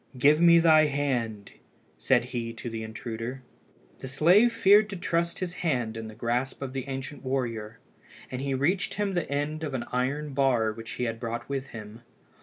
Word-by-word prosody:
"Give 150 +5 +5
me 170 0 +7
thy 160 -2 +6
hand," 125 -8 -2 0.4
said - - +2
he 115 -1 -3
to 115 +1 -7
the 110 0 -4
intruder. 115 +3 -6 0.6
The - - -7
slave 175 - +5
feared 215 -2 +5
to 200 - -5
trust 170 -1 -1
his 180 -2 -4
hand 125 -9 0
in 115 -1 -6
the 110 - -10
grasp 125 +5 -2
of 130 -1 -5
the 135 0 -4
ancient 135 +1 -6
warrior, 115 -4 -3 0.5
and 130 0 -4
he 135 -1 -1
reached 175 +9 0
him 205 -1 -1
the 175 -3 -1
end 145 +2 -2
of 145 -4 -3
an 120 -2 -3
iron 140 +4 -1
bar 130 -5 +2
which 115 +1 -8
he - - -3
had 115 -1 -2
brought 120 0 -4
with 135 -1 -3
him. 110 +1 -10
135 Hz, 190 wpm, -27 LUFS, 115-155 Hz, 0.6 s, me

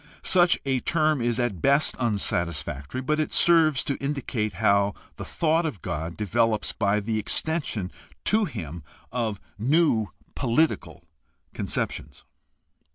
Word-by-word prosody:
Such 175 -1 +4
a 135 -1 +1
term 155 -1 +1
is 120 0 0
at 105 -9 -1
best 140 +2 +3
unsatisfactory, 85 - -2
but 150 +4 0
it 155 - -1
serves 160 -5 +4
to 140 - -2
indicate 130 -7 -2
how 100 0 +2 0.2
the - - -6
thought 165 0 +1
of 145 - -4
God 85 -1 -4
develops 110 +1 +1
by 100 +1 +1
the 110 +1 -2
extension 125 - -1 0.3
to 215 0 +3
him 85 - -6 0.3
of 115 -4 -2 0.2
new 130 -3 +3 0.3
political 120 - 0 0.5
conceptions. 70 -3 -3
120 Hz, 125 wpm, -25 LUFS, 100-155 Hz, 0.5 s, Such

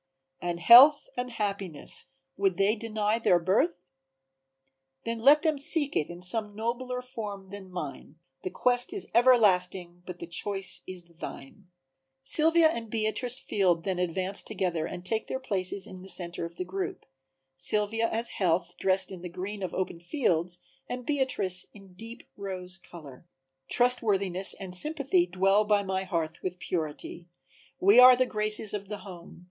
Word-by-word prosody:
"And 175 -1 -3
Health 265 - +8
and 250 0 -4
Happiness, 200 -8 -3 0.3
would 195 -3 0
they 200 +3 +2
deny 215 0 -2
their 185 -6 +3
birth? 175 0 0 1.2
Then 230 0 -3
let 285 +6 +5
them 310 -3 0
seek 285 0 +3
it 150 - -1
in 175 +1 -10
some 210 +2 0
nobler 250 +3 -4
form 205 -6 -8
than 200 -2 -10
mine, 150 -4 -7 0.3
The - - -4
quest 245 - +1
is 405 - -2
everlasting 185 -7 +2
but 180 -1 -7
the 170 - -8
choice 195 +3 -1
is 185 -1 -6
thine." 170 +1 -11 0.6
Sylvia 320 - +7
and 230 -7 -5
Beatrice 230 +3 -1
Field 180 -5 0
then 190 -2 -3
advance 185 +2 +1
together 180 -6 -3
and 180 0 -9
take 220 +3 -1
their 260 - -4
places 195 -5 -1
in 185 -3 -10
the 190 - -6
center 170 -2 -1
of 170 0 -10
the 180 - -5
group, 190 +1 -5 0.5
Sylvia 210 +9 +1
as 230 +1 -1
Health 180 -2 -1
dressed 190 0 +1
in 185 -2 -9
the 180 - -7
green 190 +4 -7
of 185 - -3
the - - -7
open 185 -2 -3
fields 175 - -1 0.3
and 250 0 -6
Beatrice 260 -11 -1
in 195 -2 -16
deep 225 +5 -10
rose 185 -2 -3
color. 155 -3 -14 0.4
"Trustworthiness 200 -7 +1
and 190 -2 -7
Sympathy 275 - +1
dwell 195 +3 +2
by 210 -1 +1
my 190 0 -3
hearth 165 -4 -3
With 180 -1 -4
Purity; 170 0 -5 0.5
we 200 +6 +5
are 250 0 +9
the 255 +1 +1
graces 215 -2 -1
of 200 -1 -5
the 210 +1 -6
home. 175 -3 -12
195 Hz, 160 wpm, -27 LUFS, 180-230 Hz, 1.2 s, are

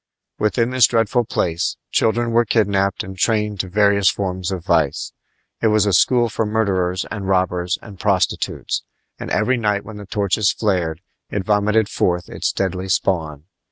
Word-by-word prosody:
Within 115 +3 +1
this 130 -2 +5
dreadful 115 +1 +1
place 85 -5 -1
children 115 +1 +1
were 120 +1 +4
kidnapped 100 -4 +1
and 95 0 -8
trained 105 0 0
to 95 - -1
various 100 0 +3
forms 95 -2 -3
of 90 -3 -5
vice. - - 0 0.5
It 115 - +3
was 105 -1 +3
a 100 - +1
school 120 +7 +4
for 110 0 -2
murderers 95 -4 0
and 100 -3 -4
robbers 90 -1 0
and 100 -4 -12
prostitutes; 95 -2 0 0.4
and - - -6
every 125 +4 +1
night 105 -3 0
when 110 -2 -9
the 105 -1 -10
torches 100 0 +1
flared 90 -6 -1 0.3
it 100 -2 -3
vomited 105 +1 +2
forth 90 -3 -1
its - - -2
deadly 95 0 -2
spawn. 80 -7 -1
100 Hz, 160 wpm, -20 LUFS, 95-110 Hz, 0.5 s, this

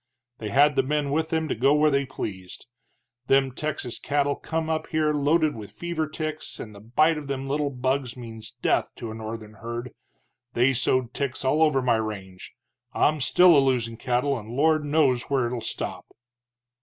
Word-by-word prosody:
They 110 - -4
had 145 +3 +4
the 135 - +4
men 145 +1 -1
with 160 +2 0
them 160 -1 0
to - - -1
go 135 +6 +3
where 150 0 +4
they 140 -1 +1
pleased. 95 -7 -7 0.6
Them 135 -1 +3
Texas 135 -3 -4
cattle 145 0 0
come 160 0 -3
up 160 -1 -1
here 155 -1 +1
loaded 150 +2 +2
with 105 -3 -8
fever 170 -2 -3
ticks, 155 0 -5
and 110 - -8
the 100 - -12
bite 155 +9 +2
of 145 - -9
them 135 -1 -3
little 145 +1 0
bugs 130 -1 -2
means 115 -1 -9
death - - +2
to 115 -3 -6
a - - -6
northern 110 -1 -7
herd. 120 +2 -6 0.6
They 125 +3 +3
sowed 125 0 +1
ticks 135 -2 -3
all 150 +4 +2
over 150 -4 +3
my 120 -2 +3
range. 95 -4 -6 0.4
I'm 150 -1 +2
still 180 +5 +6
a - - +7
losin' 120 -4 0
cattle, 125 +2 0
and 110 0 -11
Lord 155 +5 +2
knows 145 -5 +2
where 135 -3 +2
it 120 - -3
will 120 - -3
stop." - - -5
135 Hz, 190 wpm, -25 LUFS, 120-150 Hz, 0.6 s, a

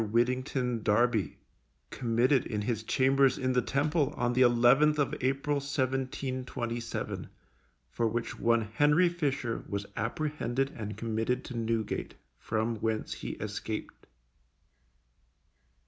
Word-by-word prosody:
WIDDINGTON 125 +2 0
DARBY, 110 0 +2 0.5
committed 125 +2 +2
in 105 -2 -2
his 110 -1 -1
chambers 135 +3 +3
in 130 0 0
the 125 - +3
Temple, 145 +3 0
on 120 0 +1
the 125 - +2
11th 125 +5 +5
of 145 -2 +1
April, 140 +3 +1
1727, 130 -3 -3 0.6
for 115 - -1
which 115 +1 -3
one 115 0 +3
HENRY 150 - +3
FISHER 140 -8 -2
was 100 0 -3
apprehended 135 +1 -1
and 105 -2 -5
committed 115 +3 -1
to 125 - -7
Newgate, 115 -2 -2 0.2
from 110 +1 -1
whence 110 0 -2
he - - -5
escaped. - - -5
125 Hz, 115 wpm, -30 LUFS, 115-135 Hz, 0.6 s, 11th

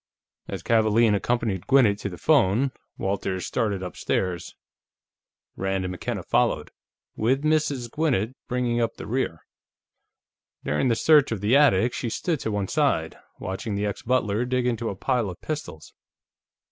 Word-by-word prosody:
As - - -6
Kavaalen 110 0 +3
accompanied 105 -3 -1
Gwinnett 120 -7 +4
to 100 - -3
the 90 - -8
phone, 130 -3 +3 0.3
Walters 95 -1 -2
started 105 -6 -1
upstairs. 90 -1 -2 1.0
Rand 95 -1 -1
and 90 - -3
McKenna 90 - -4
followed, - - +1 0.4
with 130 +6 +1
Mrs. 150 -5 +1
Gwinnett 130 -7 0
bringing 125 -1 0
up 115 -1 -1
the - - -8
rear. 115 -9 -2 1.2
During 75 - 0
the 115 - +3
search 150 +2 +5
of 110 - -2
the 105 +6 +3
attic, 125 -5 +4
she 120 - -3
stood 160 +6 -1
to 110 - -3
one 100 -2 -1
side, - - +1 0.2
watching 95 +3 -4
the 100 +1 -1
ex 105 - -3
butler 115 -3 +1
dig 125 0 0
into 115 -2 -1
a 100 - -4
pile 120 0 0
of 90 - -9
pistols. 145 - -6
115 Hz, 150 wpm, -25 LUFS, 100-130 Hz, 1.2 s, search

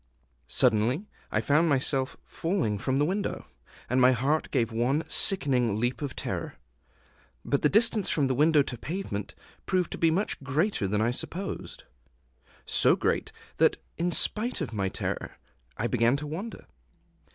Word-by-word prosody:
Suddenly 125 - +2 0.3
I - - +1
found 155 +4 +3
myself 135 -1 0
falling 165 - -2
from 130 +4 0
the 145 - +3
window; 195 +5 -2 0.4
and 130 +2 +2
my 130 +1 +6
heart 140 +6 0
gave 120 -4 0
one 125 +7 +1
sickening 125 - +2
leap 120 +1 -1
of 140 -3 -4
terror. - - -4 0.9
But 140 - 0
the 150 - +4
distance 220 0 +3
from 145 - +1
window 145 +3 +4
to 125 -3 -7
pavement 150 - -5 0.3
proved 185 -2 0
to - - -5
be 165 - +4
much 185 +1 -1
greater 140 - 0
than 105 +2 0
I 115 +2 +2
supposed, 185 +9 -5 0.8
so - - +4
great - - -1 0.3
that, - - +4 0.2
in 175 +1 -1
spite 220 +7 +2
of 140 -9 -4
my 100 -3 -1
fear, - - -4 0.4
I 110 - -2
began 120 +1 +2
to 145 +1 -4
wonder. 180 +10 -6
140 Hz, 150 wpm, -28 LUFS, 120-170 Hz, 0.9 s, my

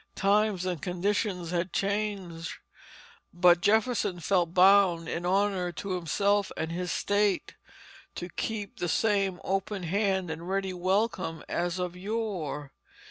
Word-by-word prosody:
Times 200 -1 +2
and 180 -4 -2
conditions 180 -1 -1
had 175 0 -1
changed, 195 -5 -2 0.8
but 175 0 +5
Jefferson 215 -2 +2
felt 175 0 +1
bound 185 -2 +5
in 175 +2 -3
honor 190 -1 +1
to 195 +3 -5
himself 200 +3 +1
and 160 - -2
his 180 +1 -3
state 205 -1 +1 0.6
to 175 - -5
keep 205 +2 -4
the 175 - -1
same 195 -2 +1
open 195 0 -2
hand 190 0 0
and 165 +3 -6
ready 195 -1 -1
welcome 185 -3 -1
as 175 +1 -1
of 180 -1 -3
yore. 185 -8 -4
185 Hz, 130 wpm, -28 LUFS, 175-200 Hz, 0.8 s, but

